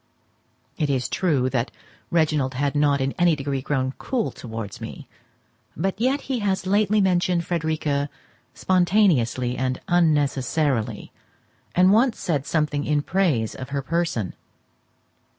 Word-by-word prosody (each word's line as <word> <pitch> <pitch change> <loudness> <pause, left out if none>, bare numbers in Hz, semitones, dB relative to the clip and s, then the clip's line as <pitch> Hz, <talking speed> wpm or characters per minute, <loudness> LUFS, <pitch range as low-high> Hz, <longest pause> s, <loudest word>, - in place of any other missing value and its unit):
It 150 - +1
is 130 -2 0
true 145 -9 +1
that 125 -1 0 0.4
Reginald 150 -5 +1
had 140 +2 -1
not 145 -1 +3
in 135 +1 0
any 175 -2 +4
degree 135 -1 -3
grown 130 -1 -1
cool 245 -5 -1
towards 110 -4 -7
me; - - -8 0.7
but 195 +5 -2
yet 265 +4 +2
he 265 -3 -2
has 195 -2 -1
lately 205 +2 +2
mentioned 180 -2 +2
Frederica 155 -4 -1 0.5
spontaneously 175 - +2
and 130 0 -1
unnecessarily, 145 - +1 0.6
and 185 +2 +5
once 235 +2 +3
said 145 -6 -1
something 150 -2 0
in 145 -1 +1
praise 155 - +1
of 130 - -8
her 140 -1 -2
person. 165 - -1
150 Hz, 130 wpm, -23 LUFS, 135-185 Hz, 0.7 s, and